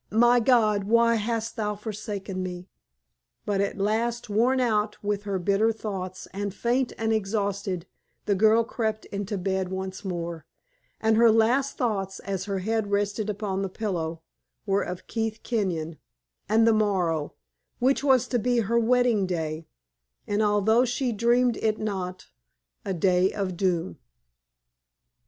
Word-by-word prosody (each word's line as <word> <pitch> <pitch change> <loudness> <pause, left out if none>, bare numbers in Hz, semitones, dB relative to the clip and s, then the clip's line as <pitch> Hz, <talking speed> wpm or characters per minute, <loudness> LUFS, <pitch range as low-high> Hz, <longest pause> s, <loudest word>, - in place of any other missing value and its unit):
my 240 +2 +5
God! 220 -4 +3
why 230 +2 +4
hast 225 0 -2
Thou 210 -2 -2
forsaken 205 -2 -5
me?" 180 0 -5 0.8
But 200 -1 0
at 200 - -2
last, 225 +3 -1
worn 245 +5 +3
out 215 -4 +1
with 205 0 -2
her 200 -2 -1
bitter 200 +5 +2
thoughts, 190 -4 -5
and 200 0 -4
faint 245 +2 0
and 225 0 0
exhausted, 200 -3 -1 0.4
the 205 - +2
girl 220 +3 +4
crept 220 -2 -3
into 200 +1 -4
bed 190 0 -1
once 190 +1 -5
more; 170 -4 -5 0.5
and 220 0 +2
her 230 0 +6
last 240 +5 +2
thoughts, 195 -7 -1
as 195 -2 -3
her 200 -1 -2
head 220 -2 0
rested 205 +1 0
upon 200 -2 -2
the 195 - -2
pillow, 170 -6 -3 0.4
were 200 -1 +2
of 180 0 -5
Keith 225 -1 -3
Kenyon, 170 -9 -2 0.5
and 225 +1 +4
the 230 - +5
morrow, 180 -8 0 0.4
which 265 +3 +2
was 265 -4 +4
to 245 - +1
be 245 +1 +2
her 230 +3 +1
wedding 235 -4 +3
day, 160 -2 -3 0.6
and, 205 +1 0
although 215 +3 +3
she 250 0 -1
dreamed 235 +2 +2
it 215 -1 0
not, 185 -4 -4 0.6
a 190 - -2
day 180 +2 +3
of 195 -3 -3
doom. 170 - -1
210 Hz, 145 wpm, -26 LUFS, 190-225 Hz, 0.8 s, her